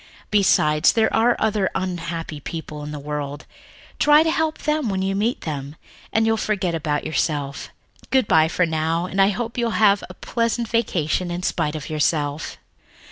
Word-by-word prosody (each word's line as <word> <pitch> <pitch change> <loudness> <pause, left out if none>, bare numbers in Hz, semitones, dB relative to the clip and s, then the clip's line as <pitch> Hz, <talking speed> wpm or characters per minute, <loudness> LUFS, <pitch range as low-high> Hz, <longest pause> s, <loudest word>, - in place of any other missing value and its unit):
Besides, 155 -6 +4
there 220 -1 +2
are 235 +2 +4
other 210 -3 +1
unhappy 165 -4 -4
people 155 0 -7
in 150 - -6
the 150 - -5
world 145 0 -5 0.5
try 295 +1 +6
to 320 - +1
help 320 -1 0
them 300 -5 -1
when 190 -1 -1
you 195 0 0
meet 215 +5 0
them, 145 -2 -5 0.4
and 225 0 +2
you'll 225 0 +2
forget 195 -5 -1
about 150 -2 -1
yourself. 145 -3 -2 0.4
Good 260 -5 +2
by 160 0 +5
for 180 +2 +1
now, 160 +1 -1
and 190 +1 0
I 195 - +5
hope 230 +4 -3
you'll 235 -2 0
have 205 -2 +4
a 185 - -10
pleasant 230 +2 -1
vacation 180 -7 0
in 175 +1 -4
spite 150 -4 -1
of 150 - -6
yourself." 150 -1 -1
180 Hz, 175 wpm, -22 LUFS, 155-225 Hz, 0.5 s, try